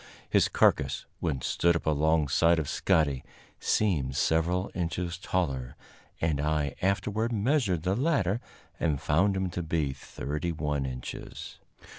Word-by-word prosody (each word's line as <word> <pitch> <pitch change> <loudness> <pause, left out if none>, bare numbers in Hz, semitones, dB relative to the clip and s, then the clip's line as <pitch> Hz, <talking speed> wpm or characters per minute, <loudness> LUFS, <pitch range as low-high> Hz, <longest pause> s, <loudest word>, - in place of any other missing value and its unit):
His - - +3
carcass, - - +2
when 75 -7 -1
stood 85 +5 +2
up 85 - -2
alongside 80 +2 +3
of 80 -3 -1
Scotty, 70 -4 +1 0.4
seemed 75 -12 +1
several 85 +6 +1
inches 85 0 -2
taller, 70 -11 -2 0.4
and 80 -3 0
I 75 -2 0
afterward 105 +4 0
measured 110 - +1
the 95 +2 +1
latter 120 - +1 0.4
and 75 -5 +1
found 95 +6 +2
him 95 -1 -1
to 90 - -3
be 80 -4 -1
thirty 75 +5 -4
one 75 -3 -1
inches. 65 -1 -7
80 Hz, 130 wpm, -29 LUFS, 75-95 Hz, 0.4 s, His